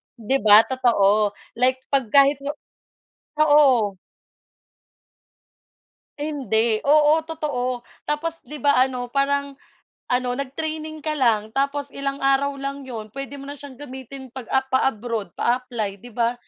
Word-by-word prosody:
'di 250 Hz, +3 st, +1 dB
ba 215 Hz, +1 st, +8 dB
totoo 215 Hz, -5 st, +2 dB, 0.2 s
like 255 Hz, +1 st, +4 dB, 0.2 s
'pag 270 Hz, -4 st, +2 dB
kahit 275 Hz, +3 st, +4 dB
nga, 290 Hz, +2 st, -4 dB, 0.9 s
oo. 255 Hz, -9 st, +4 dB, 2.2 s
Hindi 235 Hz, -7 st, 0 dB
,oo 300 Hz, +2 st, +4 dB
totoo, 255 Hz, -6 st, -3 dB, 0.2 s
tapos 315 Hz, +2 st, -2 dB
'di 300 Hz, -1 st, -9 dB
ba 285 Hz, +2 st, +3 dB
ano 250 Hz, -2 st, -3 dB
parang 280 Hz, +1 st, 0 dB, 0.5 s
ano 250 Hz, 0 st, +1 dB
nag-training 310 Hz, +3 st, -5 dB
ka 310 Hz, +1 st, -2 dB
lang 220 Hz, -4 st, +2 dB
tapos 280 Hz, +1 st, -1 dB
ilang 275 Hz, 0 st, -3 dB
araw 275 Hz, +1 st, +2 dB
lang 275 Hz, 0 st, -4 dB
'yon 220 Hz, -4 st, -7 dB
puwede 275 Hz, +1 st, -6 dB
mo -, -, -9 dB
na -, -, -5 dB
siyang 280 Hz, -1 st, -11 dB
gamitin 265 Hz, -1 st, -9 dB
pag, 260 Hz, -3 st, -7 dB
ah, 265 Hz, -, +4 dB
pa-abroad 230 Hz, -7 st, -1 dB
pa-apply 240 Hz, -5 st, -1 dB
'di 245 Hz, -, -11 dB
ba, 235 Hz, 0 st, +1 dB
265 Hz, 130 wpm, -23 LUFS, 240-285 Hz, 2.2 s, ba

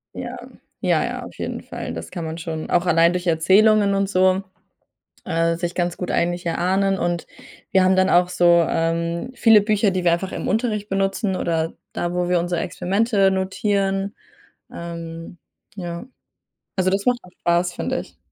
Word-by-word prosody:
Ja, -, -, -6 dB, 0.4 s
ja, -, -, +2 dB
ja, -, -, -4 dB
auf -, -, -11 dB
jeden -, -, -4 dB
Fall. -, -, -6 dB
Das 80 Hz, 0 st, -7 dB
kann 165 Hz, -, -5 dB
man 160 Hz, +1 st, -5 dB
schon 160 Hz, -1 st, -5 dB
auch 175 Hz, +1 st, +2 dB
allein 170 Hz, 0 st, +4 dB
durch 180 Hz, 0 st, -3 dB
Erzählungen 200 Hz, +5 st, +4 dB
und 195 Hz, 0 st, 0 dB
so, 185 Hz, 0 st, +3 dB, 0.8 s
äh, 165 Hz, -1 st, +1 dB
sich 175 Hz, 0 st, -3 dB
ganz 175 Hz, -1 st, -1 dB
gut 180 Hz, -, -4 dB
eigentlich 175 Hz, 0 st, 0 dB
erahnen 190 Hz, +3 st, +1 dB
und 175 Hz, -1 st, -1 dB, 0.5 s
wir 190 Hz, -1 st, +5 dB
haben 185 Hz, 0 st, +4 dB
dann 185 Hz, 0 st, +3 dB
auch 175 Hz, 0 st, +4 dB
so, 175 Hz, -1 st, +4 dB
ähm, 170 Hz, +6 st, -1 dB
viele 225 Hz, -3 st, +6 dB
Bücher, 210 Hz, 0 st, +2 dB
die 185 Hz, -1 st, -2 dB
wir 170 Hz, -, +4 dB
einfach 185 Hz, +3 st, -1 dB
im -, -, -4 dB
Unterricht 215 Hz, -1 st, -1 dB
benutzen, 195 Hz, +1 st, 0 dB
oder 165 Hz, -1 st, -1 dB, 0.2 s
da, 175 Hz, 0 st, -2 dB
wo 180 Hz, 0 st, 0 dB
wir 180 Hz, -1 st, +3 dB
unsere 175 Hz, 0 st, -1 dB
Experimente 195 Hz, +4 st, +1 dB
notieren. 195 Hz, +1 st, -1 dB, 0.6 s
Ähm, 170 Hz, 0 st, -7 dB, 0.4 s
ja. 175 Hz, 0 st, -5 dB, 0.7 s
Also, 185 Hz, 0 st, +2 dB
das 195 Hz, +1 st, -1 dB
macht 245 Hz, -1 st, +2 dB
auch 180 Hz, -, -16 dB
spaß, 175 Hz, +1 st, +1 dB
finde -, -, -2 dB
ich. 90 Hz, -, -16 dB
180 Hz, 175 wpm, -22 LUFS, 170-195 Hz, 0.8 s, viele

